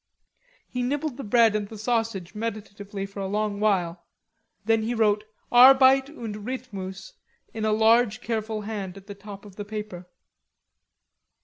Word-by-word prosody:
He 250 - -4
nibbled 280 +2 -2
the 275 - -6
bread 225 0 +4
and 210 -1 -1
the 220 - -10
sausage 220 -5 -2
meditatively 205 -2 -5
for 195 0 -9
a 195 - -2
long 205 0 -1
while, 180 -5 0 0.6
then 225 0 +2
wrote 210 -1 +2 0.3
"Arbeit 265 +2 +7
und 230 -8 -7
Rhythmus" 225 - -6 0.4
in 220 -1 -3
a 215 - +2
large 220 0 +4
careful 220 -1 -3
hand 200 -3 -5
at 195 - -13
the 205 - -8
top 200 0 -11
of 200 -2 -14
the 205 - -4
paper. 205 -4 -7
215 Hz, 145 wpm, -25 LUFS, 200-230 Hz, 0.6 s, Arbeit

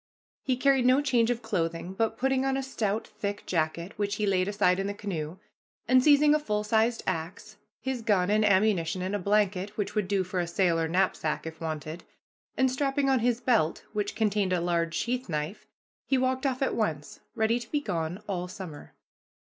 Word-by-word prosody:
He 255 -2 0
carried 265 -1 +3
no 255 +2 +5
change 245 -5 +2
of 240 -1 -1
clothing, 170 -4 -2
but, 225 +2 -1
putting 265 +1 +1
on 270 0 +1
a 270 - -2
stout, 220 -5 -2
thick 205 -1 -5
jacket, 170 +2 -1
which 205 0 0
he 210 - -1
laid 185 -2 +2
aside 200 -3 +2
in 195 - -1
the 200 - -3
canoe, 175 -5 -4 0.5
and 255 0 +5
seizing 295 0 +6
a 305 - +3
full 210 -7 -1
sized 225 +2 +1
axe, 180 +7 -4 0.2
his 265 -2 -3
gun 200 -4 +2
and 215 +1 +3
ammunition, 190 -4 +2
and 190 +2 -3
a - - -1
blanket, 200 0 0
which 205 - -2
would 210 -3 0
do 195 -1 +1
for 185 0 -3
a 175 - -1
sail 170 -1 +2
or 165 - 0
knapsack, 175 -3 0
if 160 0 -8
wanted, 155 +1 -5 0.5
and 260 -1 +3
strapping 275 +1 +1
on 260 - +3
his 240 0 +1
belt, 225 -11 +1
which 205 -1 -2
contained 205 -3 +1
a 180 - +2
large 170 -1 0
sheath 250 -1 -2
knife, 155 +4 -4 0.4
he 270 - +3
walked 260 +1 +1
off 260 0 -1
at - - 0
once, 155 -10 -2 0.2
ready 225 +1 +2
to 235 - -10
be 295 - 0
gone 175 - -3
all 180 -3 -2
summer. 180 -5 -9
205 Hz, 200 wpm, -28 LUFS, 180-245 Hz, 0.5 s, seizing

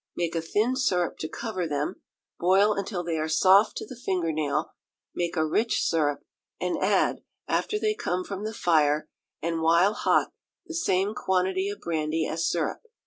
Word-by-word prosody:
Make 170 -1 -1
a 165 - -1
thin 215 +9 +1
syrup 180 - 0
to 155 - -3
cover 210 -7 -3
them, 150 +4 -3 0.4
boil 195 +4 +4
until 195 -2 -3
they 165 -2 -2
are 155 - -1
soft 190 +6 +5
to - - -4
the 255 - -9
finger 185 -8 -1
nail; 150 -2 -1 0.4
make 175 0 -2
a 160 - +2
rich 215 +8 +1
syrup, 150 -3 +1 0.4
and - - -1
add, - - +2 0.3
after 425 - 0
they 430 0 +1
come 180 - -2
from 195 +1 -6
the 215 - -3
fire, 155 -5 +2 0.4
and 165 0 -1
while 170 +5 +4
hot, - - +2 0.3
the 335 - -8
same 200 - +1
quantity 190 0 0
of 205 - -7
brandy 160 -1 -1
as 165 0 -1
syrup. 165 -3 -1
175 Hz, 175 wpm, -26 LUFS, 160-200 Hz, 0.4 s, soft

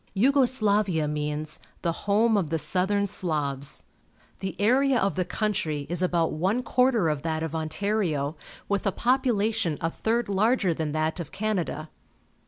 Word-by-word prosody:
Yugo 265 +6 +4
Slavia 205 - +1
means 150 +1 -3 0.2
"the 170 - +1 0.2
home 220 +2 +4
of 185 -7 0
the 165 - 0
south 180 +4 +1
ern 200 0 +2
Slavs". 145 -8 -3 0.6
The 190 - -4
area 260 +5 +3
of 195 0 0
the 185 - +1
country 175 -6 -2
is 175 0 -1
about 175 -3 +1
one 190 +10 0
quarter 250 -7 +2
of 150 -2 -1
that 160 0 -2
of 160 -1 -4
Ontario, 160 -2 -1 0.3
with 200 0 0
a - - +3
population 225 - +1
a 165 - -1
third 230 +6 0
larger 205 -1 +2
than 155 -2 -3
that 155 +3 -1
of 170 - -6
Canada. 195 -7 -2
185 Hz, 160 wpm, -26 LUFS, 155-215 Hz, 0.6 s, Yugo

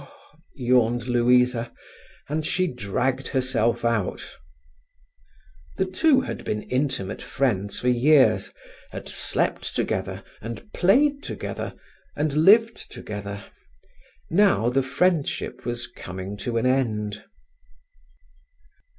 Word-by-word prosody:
yawned 120 -2 +2
Louisa, 125 -1 +2 0.6
and 155 +2 -2
she 185 +4 +1
dragged 130 - -2
herself 120 -3 0
out. 115 -5 -1 1.4
The 190 - +1
two 270 - +3
had - - -6
been 105 0 -3
intimate 125 -8 -2
friends 115 -6 -1
for 125 - -3
years, 130 +4 +4 0.4
had - - -8
slept - - -2
together, - - -2 0.2
and 115 - -8
played 280 +10 +3
together - - -5 0.4
and 150 0 -1
lived 220 +8 +4
together. 100 -1 -7 0.9
Now 190 - +4
the 135 +2 +2
friendship 140 -3 -1
was 120 0 -2
coming 95 +2 -7
to 115 +3 -3
an 115 - 0
end. 110 -5 0
125 Hz, 100 wpm, -24 LUFS, 115-150 Hz, 1.4 s, years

